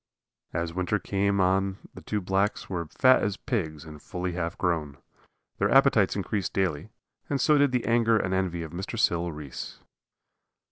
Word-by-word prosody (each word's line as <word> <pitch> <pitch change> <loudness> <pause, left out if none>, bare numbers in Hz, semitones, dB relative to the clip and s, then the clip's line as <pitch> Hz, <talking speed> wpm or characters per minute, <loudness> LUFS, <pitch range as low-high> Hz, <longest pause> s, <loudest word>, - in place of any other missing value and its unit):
As 85 0 -3
winter 90 +3 0
came 100 0 0
on 95 +1 +2 0.2
the - - -11
two 105 -1 -2
blacks 95 +3 0
were 85 -3 -3
fat 130 +10 +4
as 100 -1 -1
pigs 80 - -3
and 75 -2 -11
fully 90 0 -4
half 85 0 -3
grown. 80 -6 -1 0.6
Their - - +2
appetites - - +4
increased 100 -3 -2
daily, 95 -1 -1 0.4
and 140 - 0
so 150 +2 +4
did 140 -2 +4
the 125 -2 0
anger 115 -1 +3
and 95 -3 -1
envy 90 -3 -1
of 80 - -8
Mr. 95 +7 -5
Sil 85 -5 +2
Reese. 75 -4 -8
95 Hz, 170 wpm, -27 LUFS, 85-105 Hz, 0.6 s, fat